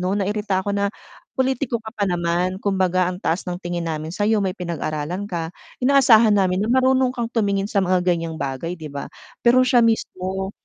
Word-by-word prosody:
no'n, 190 +2 0
nairita 205 -2 -1
ako 205 0 -1
na 200 0 0 0.5
pulitiko 260 -2 0
ka 220 - -8
pa 205 - 0
naman 175 +1 0
kumbaga 185 -2 +1
ang 180 - -6
taas 170 +4 0
ng 180 0 -3
tingin 175 -1 -3
namin 155 0 -3
sa'yo, 210 +4 +1
may 185 -1 -1
pinag-aralan 170 0 -3
ka, 165 -2 -3 0.3
inaasahan 245 -5 +6
namin 185 -2 +2
na 215 - -1
marunong 260 -1 +3
kang 235 -2 -3
tumingin 200 -4 0
sa 200 - +1
mga 185 -1 +2
ganyang 165 -2 0
bagay, 155 +3 -4
'di 155 -3 -9
ba? 140 0 -5 0.3
Pero 245 +2 +4
siya 245 -2 +4
mismo, 190 -3 -2
190 Hz, 185 wpm, -22 LUFS, 175-220 Hz, 0.5 s, inaasahan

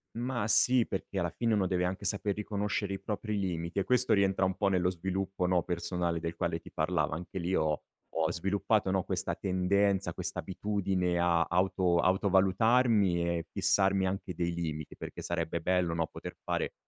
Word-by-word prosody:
Mah, 120 -1 -2
sì, 120 +2 +5
perché 95 0 -5
alla 85 -3 0
fine 115 -2 0
uno 100 -2 +2
deve 90 -1 0
anche 95 +2 -3
sapere 100 +1 0
riconoscere 105 -1 -2
i 95 - -4
propri 105 +1 -3
limiti 85 -1 -2
e - - +1
questo 125 +2 +2
rientra 95 -1 +2
un 95 0 -1
po' 100 - 0
nello 90 -2 +2
sviluppo, 95 +1 -2
no, 90 -2 +2
personale 85 -1 -2
del 85 0 -4
quale - - -1
ti - - -14
parlava. - - 0
Anche 90 +3 -6
lì 90 +2 -1
ho 75 -1 0 0.3
ho 80 -1 +1
sviluppato, 95 +2 0
no, 95 -1 +1
questa - - -2
tendenza, 95 +1 +1
questa - - -4
abitudine 95 -2 -1
a 85 -1 +3
auto 90 0 +2
autovalutarmi 95 +1 +3
e 85 - -8
fissarmi 95 -1 +2
anche 95 -1 -3
dei 85 0 -1
limiti. 80 -3 -4
Perché - - -8
sarebbe 85 -1 -2
bello, 90 -1 +1
no, 85 -1 +1
poter - - -8
fare - - -2
95 Hz, 180 wpm, -30 LUFS, 85-100 Hz, 0.3 s, sì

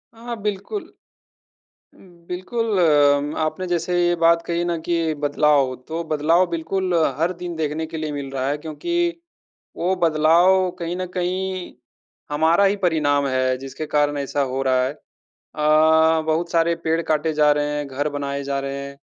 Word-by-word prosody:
हाँ, 230 - -15
हाँ 240 -1 -3
बिल्कुल। 210 - -3 1.1
उम, - - -20 0.3
बिल्कुल 205 +4 -2
अम 145 -3 +3
आपने 185 +4 -3
जैसे 175 0 -1
ये 175 - +2
बात 170 0 +5
कही 170 0 -1
ना 170 -1 -1
कि 165 -2 +1
बदलाव 145 -2 +2
तो 165 +1 -3
बदलाव 160 +4 +3
बिल्कुल 180 +3 -2 0.3
हर 165 +2 +1
दिन 175 -1 -6
देखने 155 0 -2
के 160 0 -7
लिए 155 -1 -3
मिल 140 -2 -5
रहा 135 -1 -2
है, 145 - -1
क्योंकि, 340 - -2 0.6
वो 185 +2 0
बदलाव 170 +3 +3
कहीं 170 0 -3
न 185 0 -3
कहीं 185 0 -3 0.6
हमारा 160 +6 +3
ही 200 +1 +3
परिणाम 150 -6 +1
है 130 -1 +1
जिसके 135 +3 -7
कारण 145 -1 +1
ऐसा 140 +1 -2
हो 135 +1 -1
रहा 130 -1 +2
है। 130 - -2 0.4
अ, 160 +1 +3
बहुत 160 +2 -1
सारे 170 0 +2
पेड़ 165 +1 +1
काटे 155 0 0
जा 150 -1 +4
रहे 145 0 +1
हैं, 145 -1 -3
घर 140 +2 -2
बनाए 140 -1 -4
जा 140 0 -2
रहे 135 0 -4
हैं 140 0 -10
160 Hz, 170 wpm, -22 LUFS, 145-175 Hz, 1.1 s, बात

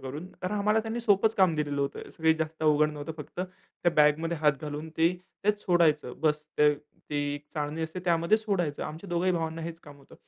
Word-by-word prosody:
करून. 145 +6 -6 0.2
तर 185 - -1
आम्हाला 210 +2 +2
त्यांनी 225 +2 -3
सोपंच 220 0 +3
काम 185 -5 +4
दिलेलं 145 -2 -1
होतं. 140 0 -3
तस - - -18
काही 160 0 +4
जास्त 160 0 -4
अवघड 155 0 +4
नव्हतं, 150 +2 -6
फक्त 150 +3 -7
त्या 180 -1 -3
बॅगमध्ये 155 +3 +4
हात 150 -1 +4
घालून 150 +1 -5
ते 165 +2 +4 0.3
ते 210 - +6
सोडायचं. 160 -9 +2
बस 150 -1 +1
ते 150 0 +6 0.4
ते 150 - -1 0.2
एक 145 - -8
चाळणी 150 +1 -2
असते 160 +3 -4
त्यामध्ये 170 +3 +3
सोडायचं. 185 -9 -1
आमच्या 160 +6 -7
दोघे 175 +1 0
ही - - +4
भावांना 165 -1 -2
हेच 165 0 -6
काम 145 -1 -13
होतं. 140 - -17
160 Hz, 210 wpm, -28 LUFS, 150-180 Hz, 0.4 s, ते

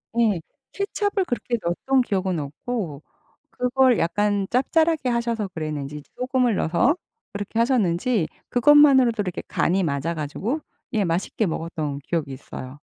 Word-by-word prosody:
네. 215 -8 +2 0.3
케첩을 400 -1 -1
그렇게 240 -2 -2
넣었던 255 +10 +1
기억은 190 -6 -1
없고 150 - -4 0.5
그걸 250 -1 +3
약간 205 +3 +1
짭짤하게 315 +2 +2
하셔서 235 -3 -1
그랬는지 150 -4 -5
소금을 250 -4 +1
넣어서 210 - +2 0.4
그렇게 205 +3 -4
하셨는지 225 - +2 0.2
그것만으로도 265 -3 +6
이렇게 180 -3 -4
간이 190 +3 +1
맞아 155 +1 -1
가지고 180 - -3 0.3
예 210 -3 +2
맛있게 180 +5 0
먹었던 160 -4 -3
기억이 160 -5 -2
있어요. 130 +1 -9
205 Hz, 335 characters per minute, -24 LUFS, 165-250 Hz, 0.5 s, 그것만으로도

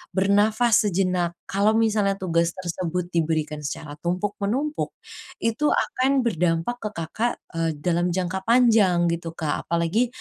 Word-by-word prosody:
bernafas 210 +3 +3
sejenak. 180 -2 0
Kalau 205 +3 +1
misalnya 215 -3 +2
tugas 170 -3 0
tersebut 180 -1 -3
diberikan 155 -2 -1
secara 145 0 -6
tumpuk-menumpuk, 205 - -2 0.5
itu 230 +6 +1
akan 265 -1 +1
berdampak 175 +2 0
ke 210 - -4
Kakak, 190 +9 -2 0.3
eee, 165 0 +1
dalam 170 +3 0
jangka 185 +1 -1
panjang 225 -7 +4
gitu, 165 -1 -4
Kak. 155 -3 -3
Apalagi 170 +8 +1
185 Hz, 125 wpm, -24 LUFS, 170-220 Hz, 0.5 s, panjang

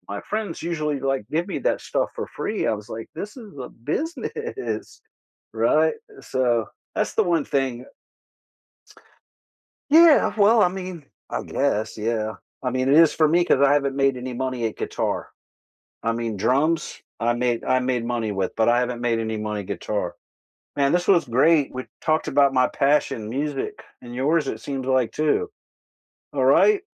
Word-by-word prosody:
my - - -4
friends 210 -5 -3
usually, 150 -3 -1
like, 135 -5 -1
give 170 +3 +1
me - - -2
that - - 0
stuff - - 0
for - - -4
free." 215 - -2
I - - +2
was 105 - -15
like, 115 - -7
"This 205 - -5
is 210 - -12
a 125 -2 -6 0.2
business, 400 +6 -4 0.8
right? 470 - +3 0.4
So, 130 - +1 0.5
that's - - -1
the - - +4
one 155 - 0
thing 135 -2 +2 2.2
Yeah. 325 0 +7
Well, 215 +1 +5
I 180 - +5
mean, 180 -4 -7 0.3
I - - -2
guess, 115 -7 -1
yeah. 110 0 -1 0.3
I 125 - -1
mean, 130 +1 0
it 140 - +5
is 165 -1 +6
for 155 - +4
me 175 +3 +3
'cause 140 - +3
I 140 0 +5
haven't 140 -2 +1
made 135 -1 +2
any 125 0 -5
money 130 -2 -2
at 110 - -5
guitar. - - -3 0.7
I 115 - +1
mean, 115 -3 -3
drums, 145 - +1 0.2
I 120 +1 +2
made 120 -1 0
I 130 0 +3
made 125 -2 -1
money 115 -3 -1
with, 95 -2 -2
but 110 +1 +3
I 120 +1 +4
haven't 125 -1 -2
made 115 -2 +1
any 110 -1 -2
money 105 -1 -3
guitar. 100 -1 -3 0.6
Man, 140 -1 +2
this 175 0 +1
was 175 -5 +5
great, 140 +4 +3
we 130 0 -6 0.2
talked 155 0 +1
about 140 0 +4
my 130 -1 +3
passion, 135 -5 +1
music, 140 +2 -3 0.2
and 120 0 -9
yours, 150 +5 +1
it - - -4
seemed 135 -2 -4
like, 130 -3 +2
too. 410 - 0 0.8
Alright? 415 -2 +4
135 Hz, 170 wpm, -23 LUFS, 120-165 Hz, 2.2 s, Yeah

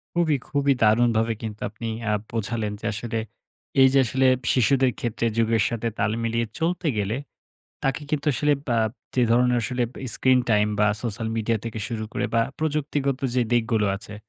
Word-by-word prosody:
খুবই, 160 -4 +2
খুবই 140 -1 +2
দারুণভাবে 115 +1 +3
কিন্তু 110 -2 -6
আপনি 110 +2 -7 0.2
আ - - +2 0.2
বোঝালেন 110 -1 -2
যে, - - -7
আসলে 115 +1 -3 0.6
এই 130 - +8
যে 135 - +5
আসলে 130 +3 +1 0.3
শিশুদের 130 +1 +3
ক্ষেত্রে 115 0 -2
যুগের 115 -2 +3
সাথে 115 0 -2
তাল 100 +1 +1
মিলিয়ে 115 +1 0
চলতে 170 +1 0
গেলে 105 +2 0 0.7
তাকে 135 +2 0
কিন্তু 150 -1 -1
আসলে 145 +4 +2 0.2
বা 115 -1 +2 0.4
যে 125 - +3
ধরনের 125 +1 +4
আসলে 125 +1 -1 0.3
স্ক্রিন-টাইম 120 -5 +3
বা 105 - +5 0.2
সোশ্যাল 115 -1 -2
মিডিয়া 110 0 0
থেকে 115 -1 -4
শুরু 110 -2 -3
করে - - -1
বা 115 - +4 0.2
প্রযুক্তিগত 145 -3 -1 0.2
যে 125 - +3
দিকগুলো 115 -3 +2
আছে, 100 +1 -10
115 Hz, 165 wpm, -24 LUFS, 110-135 Hz, 0.7 s, এই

